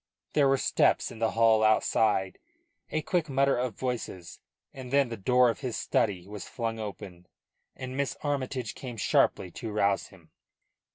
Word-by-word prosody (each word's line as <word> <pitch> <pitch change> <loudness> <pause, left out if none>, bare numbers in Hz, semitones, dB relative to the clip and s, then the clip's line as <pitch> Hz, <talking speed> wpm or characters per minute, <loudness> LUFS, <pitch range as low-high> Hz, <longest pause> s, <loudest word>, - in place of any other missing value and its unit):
There 145 -2 +4
were 135 0 +3
steps - - +2
in - - -10
the 115 -1 0
hall 110 -1 +5
outside, 110 -2 +2 0.5
a 155 - -2
quick 170 -4 0
mutter 140 0 +2
of 125 -3 -2
voices, 115 -9 -5 0.3
and 130 -2 -8
then 140 -2 +3
the 115 - -4
door 125 +4 +3
of - - -9
his 125 -5 -3
study 95 -4 0
was 105 -1 -8
flung 115 -2 -3
open, 95 -4 -8 0.5
and 130 0 -7
Miss 140 0 -2
Armytage 130 -4 -2
came 125 -3 -8
sharply 90 -3 +2
to 115 +4 -6
rouse 100 -2 +1
him. - - -19
115 Hz, 165 wpm, -28 LUFS, 105-130 Hz, 0.5 s, hall